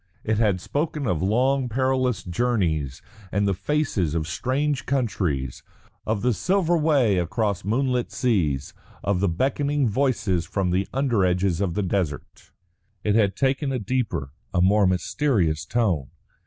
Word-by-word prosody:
It 110 0 0
had 105 -5 +2
spoken 150 - -2
of 85 -8 0
long 125 +6 +2
perilous 130 -4 0
journeys 85 - -1 0.3
and 100 0 +1
the 100 - +2
faces 100 - -1
of 80 -1 -1
strange 130 - -1
countries; 90 - -1 0.5
of 110 -1 -1
the 125 -1 +3
silver 175 - +1
way 140 - +3
across 100 +3 -1
moonlit 125 +4 0
seas; 80 - 0 0.3
of 100 -2 +1
the 100 0 +2
beckoning 140 - 0
voices 105 -7 0
from 95 -3 -1
the 95 +2 0
under 130 -7 +1
edges 90 0 +1
of 90 -4 -1
the 105 - 0
desert. 90 -6 -3 0.5
It 105 - +2
had 105 -3 +3
taken 135 +1 0
a 130 - 0
deeper, 100 - -2 0.2
a 90 - 0
more 100 +2 +4
mysterious 90 - 0
tone. 95 - 0
105 Hz, 145 wpm, -24 LUFS, 90-130 Hz, 0.5 s, more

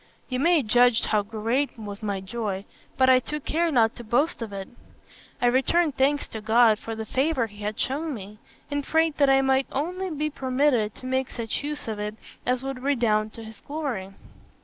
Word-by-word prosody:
You 255 -1 -1
may 330 0 +4
judge 245 +1 +4
how 215 -1 +2
great 225 +7 -1
was 205 -2 -7
my 200 -3 -2
joy, 195 -1 -4 0.3
but 260 - +5
I 260 -1 +7
took 300 +3 -6
care 335 +1 +1
not 230 -5 +3
to 240 - -8
boast 245 +7 +1
of 225 -2 -4
it. 195 -1 -6 0.7
I - - +1
returned 270 +5 +3
thanks 280 +2 +2
to 220 - -6
God 220 0 +4
for 225 - -5
the 220 0 -5
favour 265 +1 +1
he 210 -2 -13
had 210 +1 -3
shewn 300 +5 -1
me, 210 0 -10 0.3
and 285 0 -1
prayed 320 +1 +1
that 280 -1 +5
I 270 0 +5
might 265 0 +2
only 360 +7 -2
be 305 -1 -2
permitted 255 -5 +1
to - - -11
make 260 0 0
such 230 +3 -4
use 295 -2 -4
of 215 -2 -3
it 210 +1 -3 0.3
as 250 +1 +1
would 270 -1 -4
redound 230 -6 +1
to 230 - -9
his 220 0 -11
glory. 275 -11 -4
250 Hz, 200 wpm, -25 LUFS, 220-285 Hz, 0.7 s, I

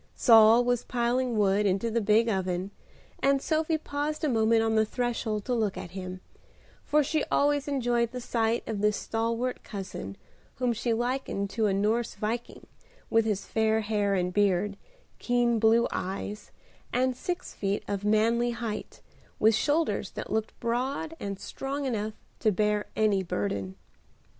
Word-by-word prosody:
Saul 225 0 +7
was 245 -1 +1
piling 245 0 0
wood 205 0 +3
into 200 +4 0
the 230 +1 +1
big 220 +2 +3
oven, 190 -2 -1 0.5
and 275 0 +3
Sophie 315 +2 0
paused 300 +1 -3
a - - +3
moment 225 -1 +3
on 225 0 +1
the 220 0 +4
threshold 220 -2 -2
to 250 - -1
look 220 -5 0
at 170 - -7
him, 185 0 -6 0.6
for 300 0 +3
she 305 +2 0
always 290 0 +1
enjoyed 240 -4 +1
the 250 - -6
sight 230 -1 0
of 215 -3 -3
this 210 0 +2
stalwart 230 +2 -2
cousin, 190 - -7 0.4
whom 250 -2 0
she 235 +1 -2
likened 240 -4 -1
to 220 +1 +1
a 195 - +1
Norse 220 +4 0
viking, 230 +2 -4 0.5
with 225 0 +4
his 210 -3 -1
fair 220 0 +1
hair 205 -2 0
and 180 -1 -1
beard, 200 0 +2 0.4
keen 240 -1 +2
blue 225 +2 +4
eyes, 200 +2 -4 0.4
and 255 0 +1
six 355 +7 -4
feet 200 0 -2
of 200 -1 -3
manly 225 +3 +2
height, 225 -3 -5 0.4
with 220 +1 +4
shoulders 295 +9 +1
that - - -6
looked 220 0 -2
broad 265 +7 -2
and 200 -1 -5
strong 275 +1 -4
enough 215 -4 -2 0.3
to 215 - +3
bear 210 +1 0
any 210 -3 +2
burden. 100 - -3
225 Hz, 155 wpm, -28 LUFS, 205-245 Hz, 0.6 s, Saul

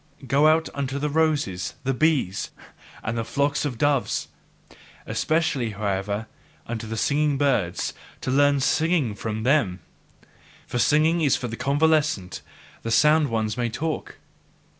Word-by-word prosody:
Go 140 +4 +4
out 160 +1 +3
unto 140 -1 -3
the 150 +1 -2
roses, 145 - 0
the 135 0 0
bees, 135 - +1 0.5
and 110 - -2
the 115 - -1
flocks 140 +5 0
of 130 -5 -3
doves! 145 0 0 0.8
Especially, 150 -8 0
however, 100 +1 -2 0.4
unto 115 -1 -5
the 115 +1 -4
singing 145 +3 +1
birds, 125 -11 0 0.3
to 130 - -2
learn 145 +1 +4
SINGING 155 -4 +1
from 110 +1 -4
them! 120 -9 +2 0.9
For 125 - -3
singing 155 +5 +3
is 145 -4 +3
for 125 - -3
the 115 - -5
convalescent; 145 - +1 0.4
the 115 - -4
sound 150 +4 +4
ones 110 -1 -1
may 120 -1 0
talk. 155 +7 -4
135 Hz, 140 wpm, -24 LUFS, 110-150 Hz, 0.9 s, Go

